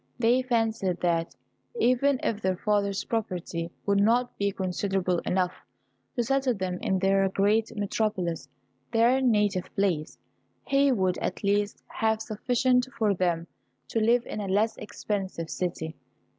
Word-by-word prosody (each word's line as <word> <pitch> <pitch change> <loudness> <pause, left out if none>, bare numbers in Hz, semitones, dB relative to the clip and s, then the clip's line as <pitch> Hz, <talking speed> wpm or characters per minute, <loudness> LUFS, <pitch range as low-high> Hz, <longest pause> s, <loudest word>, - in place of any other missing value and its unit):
They 245 +1 +3
fancied 225 -7 0
that, 170 -2 0 0.4
even 255 +2 +3
if 220 -1 -1
their 185 -1 +1
father's 200 -1 0
property 180 -6 -3 0.2
would 200 0 +3
not 240 +4 +2
be 200 0 0
considerable 185 -1 -1
enough 180 -1 +1 0.6
to 240 - +1
settle 265 0 +1
them 185 -2 -3
in 190 - +1
the 195 +1 +3
great 215 +3 +2
metropolis, 200 -5 -1 0.4
their 240 +4 +4
native 210 -6 +2
place, 175 -6 0 0.5
he 275 0 +3
would 185 -6 +1
at - - -3
least 205 +1 0
have 220 -1 0
sufficient 250 +3 +1
for 215 -3 +2
them 175 -3 0 0.4
to 225 - 0
live 235 +2 +3
in - - -5
a 200 - -4
less 210 +4 +1
expensive 190 -6 -4
city. 165 -3 -3
205 Hz, 140 wpm, -27 LUFS, 185-230 Hz, 0.6 s, their